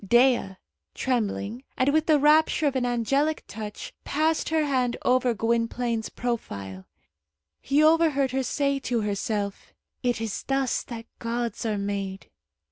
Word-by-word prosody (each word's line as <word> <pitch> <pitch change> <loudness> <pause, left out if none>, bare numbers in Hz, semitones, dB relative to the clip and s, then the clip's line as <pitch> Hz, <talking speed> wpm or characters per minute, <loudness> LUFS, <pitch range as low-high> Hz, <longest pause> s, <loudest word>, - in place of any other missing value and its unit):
Dea, 240 -2 +3 0.4
trembling, 235 -1 -1
and 265 +2 +2
with 315 0 +2
the 310 -2 +5
rapture 305 +2 +4
of 280 -2 +1
an 250 -1 +1
angelic 275 +6 +1
touch, 210 -1 -7
passed 315 +2 0
her 315 -1 +2
hand 255 -4 0
over 250 -1 +3
Gwynplaine's 230 0 0
profile. 100 - -4 0.7
He 285 +3 +3
overheard 310 -4 +4
her 265 +1 0
say 280 +2 0
to 245 -3 -1
herself, 205 0 -3 0.3
"It 245 -3 0
is 225 -3 -3
thus 270 -2 0
that 230 -2 -7
gods 235 -1 -2
are 215 -1 0
made." 200 -1 -4
245 Hz, 135 wpm, -26 LUFS, 220-275 Hz, 0.7 s, the